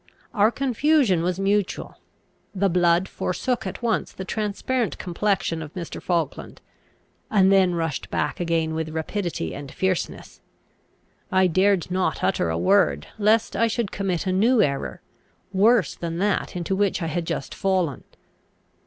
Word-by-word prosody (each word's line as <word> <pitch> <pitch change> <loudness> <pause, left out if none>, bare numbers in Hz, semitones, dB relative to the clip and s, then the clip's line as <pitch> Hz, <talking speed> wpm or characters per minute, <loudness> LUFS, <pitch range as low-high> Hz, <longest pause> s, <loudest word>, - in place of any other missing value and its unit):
Our 210 +1 +4
confusion 265 - +2
was 180 +2 -1
mutual. 200 0 -1 0.6
The 195 +1 +2
blood 175 +1 +3
forsook 215 +7 -2
at 190 - -7
once 230 -2 0
the 190 - -7
transparent 215 +4 -2
complexion 185 -2 -1
of 150 -1 -9
Mr. 175 -3 -6
Falkland, 165 -5 -2 0.7
and 195 -2 +4
then 190 -2 +4
rushed 165 -4 -3
back - - -2
again 165 -2 0
with 160 0 -2
rapidity 160 - -3
and 140 -1 -8
fierceness. 190 -2 -3 0.9
I 190 0 +4
dared 185 +1 +2
not 180 -4 0
utter 85 - +1
a 80 - -1
word, 195 - +2
lest 215 +2 +2
I 230 - +3
should 225 -2 -2
commit 190 -3 -2
a 185 - 0
new 225 +6 +3
error, 140 -9 0 0.5
worse 210 +2 +4
than 165 -1 -5
that 200 +1 0
into 180 +2 -1
which 195 -2 0
I - - -1
had 165 +1 -2
just 135 - -3
fallen. 185 -7 0
185 Hz, 145 wpm, -24 LUFS, 170-205 Hz, 0.9 s, Our